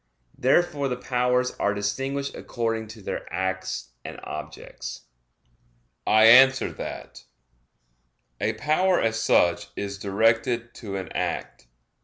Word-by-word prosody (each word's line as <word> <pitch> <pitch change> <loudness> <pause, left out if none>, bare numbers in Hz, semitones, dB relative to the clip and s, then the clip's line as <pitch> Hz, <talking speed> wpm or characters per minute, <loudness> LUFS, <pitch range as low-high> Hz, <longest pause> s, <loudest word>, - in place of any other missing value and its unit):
Therefore 140 +1 +2
the 125 - -1
powers 125 0 +1
are 100 0 +1
distinguished 135 +8 -2
according 115 -2 -3
to 110 -1 -12
their - - -5
acts 95 -8 -3
and - - -8
objects. 75 0 -7 1.1
I 110 0 +5
answer 130 +3 +7
that, - - -8 1.1
A - - 0
power 180 +5 +2
as 110 0 0
such 85 0 +3
is 100 -1 -5
directed 115 +4 +1
to 100 -4 -7
an 95 -2 -5
act. - - -4
115 Hz, 115 wpm, -25 LUFS, 100-130 Hz, 1.1 s, answer